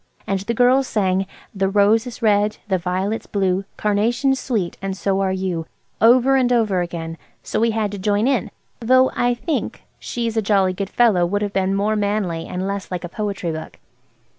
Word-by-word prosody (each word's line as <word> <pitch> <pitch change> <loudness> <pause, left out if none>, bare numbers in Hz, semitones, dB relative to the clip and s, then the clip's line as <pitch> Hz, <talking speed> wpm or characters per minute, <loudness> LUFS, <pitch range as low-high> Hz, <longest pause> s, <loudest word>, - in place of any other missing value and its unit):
And 195 -1 -1
the 230 +5 -3
girls 255 +2 +4
sang– 190 -2 0 0.3
"The 195 -1 0
rose 210 +4 +3
is 240 0 -9
red, 210 -1 +2
the 190 -2 +1
violet's 185 +5 -2
blue, 190 -1 0
Carnation's 235 +6 +1
sweet, 210 -9 -2
and 195 0 -3
so 195 0 0
are 190 -1 +1
you," 185 -4 -2 0.3
over 250 +4 +5
and 250 -2 +2
over 215 -6 +2
again, 165 -1 -5 0.2
so - - -2
we 230 +1 +3
had 220 -2 -1
to 205 - -6
join 205 +4 +1
in; 265 -3 +1 0.3
though 255 +2 +4
I 245 0 +1
think 305 +6 -3 0.2
"She's 230 -2 -3
a 220 - +2
jolly 195 -3 +2
good 195 +1 -4
fellow" 220 -7 +3
would 205 +3 -1
have 205 -1 -3
been 190 0 +1
more 210 +2 +1
manly 200 -5 -1
and 180 +1 -4
less 200 -1 -4
like 180 -1 -4
a 175 - -5
poetry 200 -4 -3
book. 160 0 -7
205 Hz, 190 wpm, -21 LUFS, 190-230 Hz, 0.3 s, over